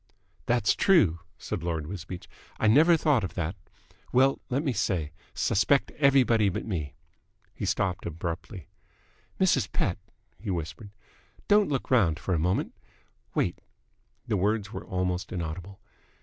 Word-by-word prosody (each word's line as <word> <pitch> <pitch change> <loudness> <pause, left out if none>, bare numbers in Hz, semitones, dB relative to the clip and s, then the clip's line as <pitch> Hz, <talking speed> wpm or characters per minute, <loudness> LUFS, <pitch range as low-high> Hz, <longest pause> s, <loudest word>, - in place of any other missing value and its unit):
"That's 120 -3 +3
true," 110 - +4 0.2
said - - -4
Lord 80 -3 -2
Wisbeach. 90 0 -7 0.3
"I - - +1
never 155 +10 +6
thought 150 -8 +2
of 95 - -5
that. 90 +1 -2 0.6
Well, 135 +2 +4
let 135 +4 0
me 135 -5 0
say, 90 -8 -1 0.2
suspect 135 +7 +2
everybody 130 -7 +4
but 90 - -4
me." 80 -9 -4 0.6
He - - -4
stopped 95 -2 -1
abruptly. 85 +4 -5 0.7
"Mrs. - - +2
Pett," - - -1 0.4
he 105 +2 -6
whispered, 85 +2 -4 0.6
"don't 205 0 +4
look 135 -2 -2
round 95 -11 +4
for 90 +2 -2
a 85 - +1
moment. 90 +4 0 0.6
Wait." - - 0 0.7
The 105 - +1
words 105 +2 0
were - - -5
almost 90 -1 -2
inaudible. 90 +3 -5
95 Hz, 135 wpm, -28 LUFS, 85-125 Hz, 0.7 s, never